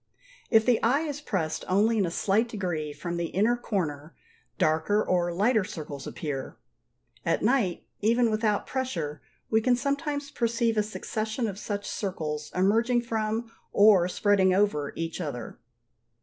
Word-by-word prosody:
If 225 -2 +5
the 245 -2 +3
eye 265 +6 +3
is 295 -2 -4
pressed 180 - -2
only 215 +4 +3
in 195 - +2
a - - -1
slight 205 +7 +1
degree 175 -8 -3
from 170 +4 -5
the 170 0 -1
inner 215 +8 +2
corner, 165 -10 -3 0.4
darker 160 +7 +2
or 175 -1 +1
lighter 210 +5 +2
circles 155 -8 -7
appear. 140 -4 -5 0.7
At - - 0
night, 215 -7 +1
even 230 +2 +3
without 215 -1 +1
pressure, 165 - -3 0.3
we 220 0 +4
can 245 +2 +3
sometimes 285 +2 -2
perceive 235 -2 0
a 210 - +3
succession 220 +2 -3
of 200 -1 -5
such 205 -1 -4
circles 155 -7 -4
emerging 230 +6 +3
from, 225 0 -2 0.2
or 200 -4 +6
spreading 190 -1 +3
over, 170 -8 +1
each 165 +2 -4
other. 125 -8 -5
205 Hz, 150 wpm, -27 LUFS, 170-230 Hz, 0.7 s, or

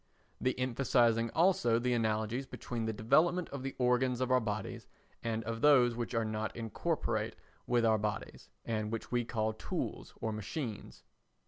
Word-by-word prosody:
The 130 - 0
emphasising 120 -2 +2
also 170 -10 +4
the 125 +1 +1
analogies 110 +3 0
between 115 -2 -4
the 110 - 0
development 160 +11 +2
of 140 - -6
the 135 +1 -4
organs 125 0 +2
of 130 0 0
our 130 - +6
bodies 110 -3 -4 0.3
and 115 -1 -2
of 115 +1 -4
those 130 -5 +6
which 120 0 -3
are 115 -1 +1
not 110 0 -3
incorporate 115 -2 -2 0.3
with 120 -1 +3
our 110 -1 +4
bodies 105 0 -4 0.2
and 110 -1 -2
which 115 - -4
we 120 -1 +2
call 110 -1 -1
tools 110 - -4
or 110 - -2
machines. 110 +2 -5
115 Hz, 160 wpm, -33 LUFS, 110-125 Hz, 0.3 s, our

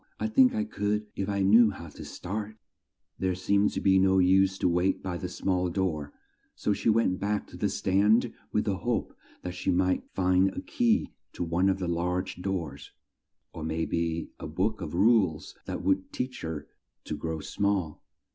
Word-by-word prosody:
I - - -1
think 255 +2 +4
I 220 - +1
could 105 - -1
if 100 0 -2
I 100 -1 0
knew 110 +4 +6
how 85 -5 -8
to - - -10
start." 105 +3 -5 0.6
There 95 -1 0
seemed 100 +3 +2
to - - -2
be 95 -1 +4
no 95 0 +4
use 95 +1 +4
to - - +1
wait 90 +2 +1
by 90 -2 -3
the 90 +1 -4
small 90 0 0
door, 85 -6 -2 0.4
so 105 - 0
she 100 - 0
went 110 -4 +2
back 105 0 -1
to - - -11
the 105 - 0
stand 105 +5 +2 0.2
with 105 - +1
the 100 -3 0
hope 120 +4 -2 0.3
that 90 - -4
she 90 +1 -3
might 95 0 +2
find 95 0 +3
a - - -5
key 235 -2 +1 0.2
to - - -3
one 85 +3 +2
of 95 - +1
the 95 -2 -3
large 90 +2 -1
doors, 90 -6 -4 0.6
or 80 - -7
may 80 +1 -1
be 85 -1 -2
a - - -6
book 95 +8 -1
of 75 - -5
rules 100 -5 +3
that - - -4
would 95 0 +1
teach 130 +1 -4
her 80 -2 -5 0.4
to 75 - -4
grow 80 +2 -4
small. 100 -2 -1
95 Hz, 190 wpm, -28 LUFS, 90-105 Hz, 0.6 s, knew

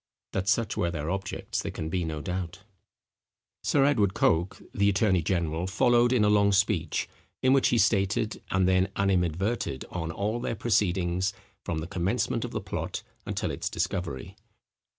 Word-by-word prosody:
That 95 0 -1
such 115 +1 +1
were 85 - 0
their 80 -1 -3
objects 95 0 -3
there - - -4
can 80 - -5
be 90 +2 -1
no 80 -2 -3
doubt. 90 0 -4 1.0
Sir 140 -2 +3
Edward 105 -9 +2
Coke, 85 +3 +2
the 100 0 +3
attorney 100 -2 +3
general, 85 0 -1
followed 120 +5 +3
in 120 -5 +4
a - - +4
long 100 -1 +4
speech, 95 -5 +1 0.4
in 130 +1 +5
which 135 - +4
he 120 - +2
stated, 105 0 +1
and 95 -1 +2
then 95 +1 +3
animadverted 95 - 0
on, 85 -2 -3
all 105 +7 -2
their 120 - -2
proceedings, 95 -4 +1 0.3
from 80 -2 -2
the - - -4
commencement 90 0 -1
of - - -3
the - - -3
plot - - -4 0.2
until - - -2
its - - -3
discovery. 90 0 -3
95 Hz, 165 wpm, -28 LUFS, 85-105 Hz, 1.0 s, in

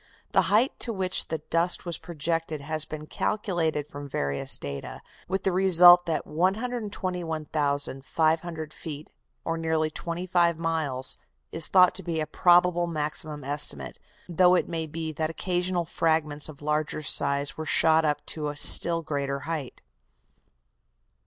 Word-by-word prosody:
The - - +2
height 220 +7 +3
to 235 - -1
which 190 -3 -1
the 155 -1 -5
dust 170 +2 +1
was 170 -1 -3
projected 165 -1 -3
has 155 +2 +1
been 155 0 -8
calculated 165 -6 -2
from 145 -1 -9
various 70 - -1
data, 70 -1 -7 0.2
with 190 +1 -3
the 190 - +1
result 180 -1 +7
that 165 - -2
121,500 160 - -2
feet, 150 -2 -9 0.3
or 165 0 -2
nearly 160 -1 -1
25 170 0 -1
miles, 155 -6 -2 0.3
is 165 - +4
thought 180 -2 +5
to 190 - -4
be 170 -2 -3
a 155 - -1
probable 175 0 +3
maximum 150 -2 -4
estimate, 130 - -1 0.3
though 180 +1 +3
it - - 0
may 165 -1 -4
be 160 +1 -5
that 155 +1 -3
occasional 175 +1 -2
fragments 160 -3 -1
of 145 -1 -12
larger 150 0 -2
size 140 0 +3
were 160 0 -7
shot 160 0 +3
up 150 -1 -1
to 150 -2 -4
a 145 - -7
still 165 +2 +6
greater 140 -2 -3
height. 150 -4 -6
160 Hz, 140 wpm, -26 LUFS, 150-175 Hz, 0.3 s, result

